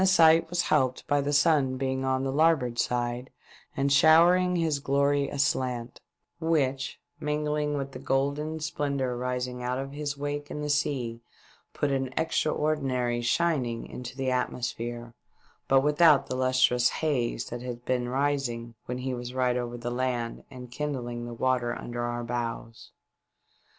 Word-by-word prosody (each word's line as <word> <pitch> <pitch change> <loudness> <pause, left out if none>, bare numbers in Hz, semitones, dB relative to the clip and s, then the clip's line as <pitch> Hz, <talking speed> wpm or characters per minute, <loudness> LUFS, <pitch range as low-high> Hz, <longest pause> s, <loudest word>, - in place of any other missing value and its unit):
sight 165 -3 +5
was 175 0 0
helped 130 -1 +1
by 145 0 +2
the 140 +1 -1
sun 145 -3 +3
being 130 0 -1
on 130 0 0
the 135 - -1
larboard 140 -5 +2
side 120 +1 -1 0.5
and 140 0 +2
showering 175 +5 +6
his 160 -4 +1
glory 140 0 +1
aslant, 130 -4 -1 0.4
which, 140 -5 0 0.2
mingling 150 0 -1
with 135 -1 -4
the - - -8
golden 145 +4 -1
splendour 140 -4 -2
rising 125 0 -3
out 125 +1 -1
of 135 +1 -4
his 145 0 -4
wake 145 0 -4
In 150 - -5
the 150 - 0
sea, 125 -5 -1 0.5
put 145 - 0
an 135 -1 -1
ex 160 0 0
traordinary 135 -6 0
shining 125 -4 0
into 125 +1 -8
the 135 -1 0
atmosphere, 120 -1 -3 0.5
but 135 0 +5
without 150 0 +5
the 130 - -4
lustrous 130 -1 +3
haze 125 -7 -1
that 120 0 -5
had 125 -1 -7
been 125 -1 0
rising 130 -4 -1
when 125 - -3
he 130 0 -3
was 120 0 -6
right 125 -1 +2
over 120 -1 -3
the 120 0 -4
land 120 -2 -2
and 125 -2 -10
kindlinor 120 -4 -4
the 120 - -6
water 125 -1 0
under 120 0 -5
our 120 0 -2
bows. 115 -1 -5
130 Hz, 155 wpm, -28 LUFS, 125-145 Hz, 0.5 s, showering